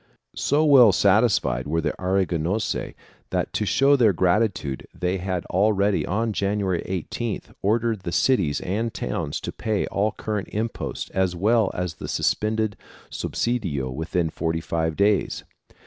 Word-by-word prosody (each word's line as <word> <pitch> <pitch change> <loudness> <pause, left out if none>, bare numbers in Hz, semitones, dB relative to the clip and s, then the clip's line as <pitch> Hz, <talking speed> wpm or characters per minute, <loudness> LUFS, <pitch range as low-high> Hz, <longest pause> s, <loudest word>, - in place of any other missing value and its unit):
So 150 +3 +2
well 130 -7 +8
satisfied 95 - +2
were 80 +3 0
the 80 -2 -1
Aragonese 95 +1 -1 0.3
that - - -2
to 105 - -1
show 140 +6 +4
their 115 -7 +4
gratitude 90 -6 0
they 90 +1 0
had 90 -1 -3
already, 100 +1 +1
on 110 +3 0
January 100 -3 0
18th, 95 +5 -4
ordered 110 +1 +1
the 90 -2 -5
cities 90 - +2
and 110 +5 -2
towns 70 +1 -3
to - - -4
pay 110 -2 -1
all 105 +2 0
current 105 -2 -3
imposts 115 +2 -4
as 95 -2 0
well 110 +3 +3
as 90 -2 -2
the - - -8
suspended 110 -2 0 0.3
subsidio 85 - -2
within 80 +3 -1
thirty 80 0 -2
five 80 -1 -2
days. 100 +2 +1
100 Hz, 140 wpm, -24 LUFS, 85-110 Hz, 0.3 s, well